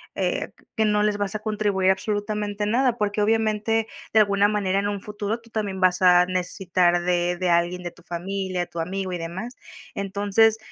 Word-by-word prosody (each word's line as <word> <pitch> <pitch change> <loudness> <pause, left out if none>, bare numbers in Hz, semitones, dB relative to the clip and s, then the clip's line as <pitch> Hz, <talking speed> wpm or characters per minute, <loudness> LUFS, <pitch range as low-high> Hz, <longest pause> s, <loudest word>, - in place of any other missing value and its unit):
eh, - - -1 0.2
que 220 - +2
no 210 -1 +2
les 210 -1 +1
vas 205 0 -2
a - - -1
contribuir 205 -3 +1
absolutamente 205 +1 -2
nada, 240 +3 +2
porque, 210 -1 0
obviamente, 220 0 +1 0.3
de 220 - +6
alguna 200 -1 +4
manera, 200 -2 0
en 200 - -1
un 205 -1 -3
futuro 210 +2 -4
tú 230 0 -20
también 205 -4 -3
vas 185 0 +3
a 180 -1 +7
necesitar 180 -1 +1
de 175 0 0
de 180 0 0
alguien 175 +1 +1
de 175 - -3
tu - - -21
familia, 185 +1 -3
tu 170 - -7
amigo 185 +3 -3
y - - -2
demás. 185 +9 -6 0.4
Entonces, 200 +3 +2
200 Hz, 185 wpm, -24 LUFS, 180-215 Hz, 0.4 s, a